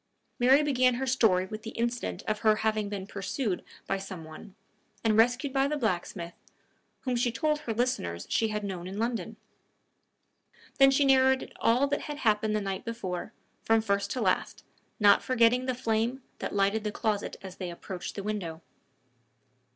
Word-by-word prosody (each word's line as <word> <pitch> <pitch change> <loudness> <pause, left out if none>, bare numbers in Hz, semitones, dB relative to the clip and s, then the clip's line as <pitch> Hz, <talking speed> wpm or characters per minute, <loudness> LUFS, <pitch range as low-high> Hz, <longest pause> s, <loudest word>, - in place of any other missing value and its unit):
Mary 265 +4 +6
began 255 -4 +3
her 265 +2 -2
story 220 -8 +3
with 215 +3 -7
the 225 - -6
incident 235 +1 -2
of 215 0 -2
her 215 -1 +4
having 215 -2 +1
been 200 -2 -4
pursued 200 +1 -3 0.2
by 195 - -1
some 190 -3 -7
one, 160 +5 -12 0.5
and 220 -2 +3
rescued 245 +5 +3
by 270 0 +3
the 300 +1 -1
blacksmith, 175 -6 -2 0.7
whom 255 -2 -1
she 240 0 +1
told 300 +4 0
her 235 -6 -3
listeners 85 - -1
she 225 - +1
had 210 -1 -3
known 185 -3 -5
in 190 +2 -6
London. 230 +1 -2 1.4
Then 270 0 +8
she 270 +1 +3
narrated 265 -1 +3
all 245 +4 +3
that 285 0 -1
had 295 -1 -6
happened 215 -4 +1
the 210 - 0
night 195 -1 -3
before, 190 -6 -4 0.3
from 225 0 +4
first 200 -2 0
to - - -3
last, - - 0 0.4
not 205 -2 +6
forgetting 250 0 +3
the 255 - 0
flame 240 +1 -1 0.2
that - - -4
lighted 200 +2 +2
the 210 - -2
closet 210 -2 -2
as 190 -1 -9
they 180 -2 -4
approached 175 +1 -7
the 200 - -5
window. 180 -6 -4
220 Hz, 175 wpm, -29 LUFS, 195-250 Hz, 1.4 s, Then